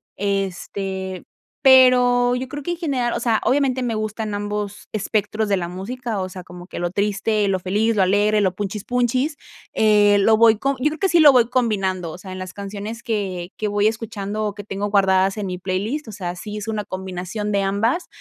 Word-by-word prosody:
Este, 190 -1 -3 0.4
pero 250 -2 +6
yo 255 +1 -3
creo 290 0 -6
que 345 - -3
en 345 - -3
general, 265 -8 -1
o - - -1
sea, 230 -2 +2
obviamente 265 -1 +2
me 235 -2 -1
gustan 215 0 -3
ambos 205 0 -4
espectros 215 +1 -1
de 200 - +3
la 170 -2 -3
música, 220 +4 -4
o 185 - -2
sea, 185 -1 -9
como 180 0 -12
que - - -9
lo 175 0 -2
triste, 205 +1 0
lo 195 -1 +1
feliz, 210 +5 0
lo 200 - +3
alegre, 205 +3 +3
lo 190 -3 +1
punchis 205 +1 -4
punchis, 255 +4 0 0.4
eh, 210 -1 +4
lo 220 +3 +5
voy 225 -1 +6
com 275 +2 0
yo 300 - +3
creo 315 - -7
que 390 - +2
sí 345 - +4
lo 295 -2 +9
voy 245 -2 +4
combinando, 195 -9 0
o - - -9
sea, 185 0 -10
en 185 - -7
las 185 0 -7
canciones 205 +3 -6
que 195 -7 -3
que 215 - -1
voy 205 +1 +2
escuchando, 215 -2 -3
o 205 - -2
que 205 - -9
tengo 200 0 -3
guardadas 195 0 +3
en 205 - -3
mi 180 -1 -4
playlist, 200 +10 -3
o - - -7
sea, 180 -3 -5
sí 210 +3 -7
es 210 +1 -6
una 215 -1 -2
combinación 190 +2 -5
de 200 - +2
ambas, 225 - 0
210 Hz, 215 wpm, -21 LUFS, 195-235 Hz, 0.4 s, lo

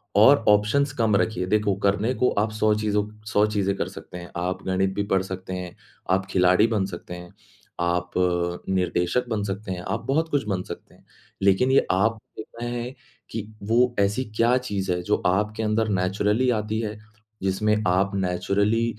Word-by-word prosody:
और 115 +5 +6
ऑप्शंस 110 +8 +3
कम 110 -3 +3
रखिए, 100 -3 0
देखो 105 0 +2
करने 100 +5 +2
को 125 - +2
आप 110 +1 0
100 110 0 +2
चीज़ों 105 -1 0 0.2
100 105 -1 +3
चीज़ें 100 -2 0
कर - - -1
सकते - - -10
हैं, 85 0 -10
आप 90 +1 -3
गणित 95 +1 +1
भी 100 - 0
पढ़ 95 - +3
सकते 95 0 -6
हैं, 90 -1 -6 0.4
आप 95 0 +2
खिलाड़ी 90 +4 +4
बन 105 -4 0
सकते 90 -2 -8
हैं, 90 +1 -11 0.5
आप 90 0 0 0.6
निर्देशक 90 +4 0
बन 110 -3 -1
सकते 100 0 -4
हैं, 90 -1 -4
आप 110 +5 -3
बहुत 160 +4 +1
कुछ 145 -6 0
बन 95 -3 -1
सकते - - -10
हैं। - - -25 0.4
लेकिन 100 +7 +4
ये 135 - +4
आप 110 +5 +2 0.2
देखना 115 +2 -7
है 120 +1 -4 0.4
कि 110 -2 -4 0.2
वो 120 +3 +2
ऐसी 100 +5 +1
क्या 120 +2 +4
चीज़ 100 -7 -2
है 90 0 -1
जो 105 +3 +2
आपके 105 +4 0
अंदर 110 +1 +1
नैचुरली 105 +6 +1
आती 110 +1 -3
है, 105 -1 -4 0.5
जिसमें 100 +3 +1
आप 95 +2 +2
नैचुरली 100 +4 +1
105 Hz, 180 wpm, -24 LUFS, 95-110 Hz, 0.6 s, और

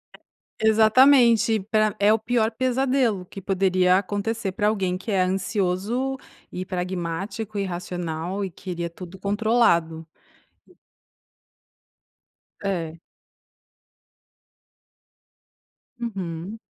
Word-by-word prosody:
É, - - -20 0.5
exatamente 225 0 +5
pra 215 -1 +2
é 205 +1 +5
o 220 - +1
pior 225 0 +1
pesadelo 255 -4 0
que 195 - -10
poderia 185 -1 +2
acontecer 205 +2 -2
pra 205 +2 0
alguém 190 -4 0
que 215 - -6
é 195 -2 +2
ansioso, 195 +7 -1 0.3
e 185 - -5
pragmático, 185 +4 -4
e - - 0
racional 175 +1 -4
e 195 - -3
queria 175 -1 -5
tudo 180 +2 -11
controlado. 200 -6 +1 2.6
É. 170 -5 -3 3.0
Uhum. 195 -3 -5
195 Hz, 90 wpm, -24 LUFS, 180-220 Hz, 3.0 s, exatamente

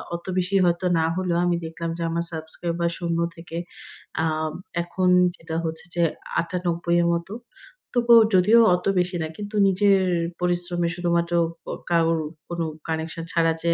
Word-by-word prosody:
অত 170 - -8
বেশি 185 +2 0
হয়তো 170 +1 +1
না 160 - +2
হলেও 180 -2 0
আমি 175 -1 +2
দেখলাম 165 +1 -5
যে - - -6
আমার 170 +1 -1
সাবস্ক্রাইবার 170 +2 -2
০ 170 -2 -2 0.2
থেকে, 165 0 -8 0.7
আ - - +2 0.6
এখন 180 +1 0 0.3
যেটা 165 -1 -7
হচ্ছে 160 +1 -4
যে 175 - +1 0.4
৯৮ 170 -1 -1
এর 170 - +2
মতো। 170 +4 -3 0.6
তবুও 235 -1 +6 0.2
যদিও 210 +6 +6 0.2
অত 180 - -6
বেশি 180 0 -1
না 160 - -2
কিন্তু 210 +1 -6
নিজের 195 +1 +4 0.4
পরিশ্রমে 175 -1 0
শুধুমাত্র 170 -1 0 0.4
আ - - -3 0.2
কারোর 165 -1 +2 0.3
কোন 170 0 -3 0.3
কানেকশন 160 +1 -3
ছাড়া 165 -1 +3
যে 170 0 +3
170 Hz, 155 wpm, -24 LUFS, 165-180 Hz, 0.7 s, তবুও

